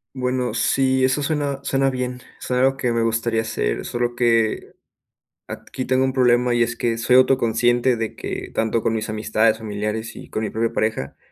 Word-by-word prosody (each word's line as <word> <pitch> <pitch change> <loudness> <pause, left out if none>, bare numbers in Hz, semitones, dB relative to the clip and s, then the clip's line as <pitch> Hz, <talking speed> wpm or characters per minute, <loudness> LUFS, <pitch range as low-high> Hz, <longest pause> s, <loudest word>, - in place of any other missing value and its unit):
Bueno, 125 -1 -1
sí, 130 -1 +2
eso 130 +3 +1
suena 145 -2 -1
suena 135 -1 +1
bien, 125 -1 -4 0.2
suena 125 0 0
algo 135 0 +2
que 125 -3 0
me 115 0 +1
gustaría 115 0 0
hacer, - - -2
solo 120 0 -2
que 115 -2 +1 0.7
aquí 130 - -6
tengo 130 +1 +2
un 130 - -1
problema. 125 -1 +3
Y 120 - +4
es 120 0 -3
que 115 -1 -1
soy 120 +2 +3
autoconsciente 120 -1 +3
de 110 -1 -4
que - - -6
tanto 110 0 0
con 115 - 0
mis 110 0 -3
amistades, 110 +1 +1
familiares 105 +1 -4
y - - -11
con 110 - -3
mi 105 - -2
propia 115 0 -1
pareja, 110 -11 -2
120 Hz, 185 wpm, -21 LUFS, 110-130 Hz, 0.7 s, Y